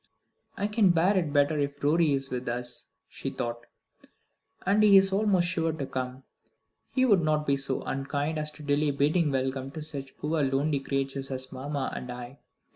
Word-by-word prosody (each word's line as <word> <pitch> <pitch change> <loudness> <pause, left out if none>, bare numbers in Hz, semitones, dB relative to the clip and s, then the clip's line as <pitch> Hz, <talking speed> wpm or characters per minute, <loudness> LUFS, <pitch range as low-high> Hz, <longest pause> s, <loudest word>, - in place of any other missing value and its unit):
"I 200 - -1
can 210 -1 +3
bear 175 +4 +3
it 170 -6 +1
better 145 +1 +3
if 145 0 -3
Rorie 155 +1 +3
is 135 -1 -2
with 125 -1 -3
us," 120 +1 -5 0.2
she - - -5
thought, 120 0 -5 1.0
"and 200 +3 +3
he 205 -2 +8
is 195 0 +4
almost 195 -4 +3
sure 165 -2 0
to 150 -3 -4
come. 130 0 -5 0.7
He 260 -1 +2
would 205 -8 +5
not 155 -1 +1
be 140 - +2
so 135 -1 -2
unkind 145 +3 -2
as 150 0 -2
to 150 - -12
delay 145 +1 +2
bidding 150 +4 +2
welcome 130 0 -1
to 155 - -6
such 140 -3 -7
poor 155 +1 -1
lonely 140 +2 +1
creatures 135 0 -3
as 130 -1 -4
mamma 135 +1 -3
and 125 - -5
I." 125 +2 -8
145 Hz, 185 wpm, -28 LUFS, 135-165 Hz, 1.0 s, he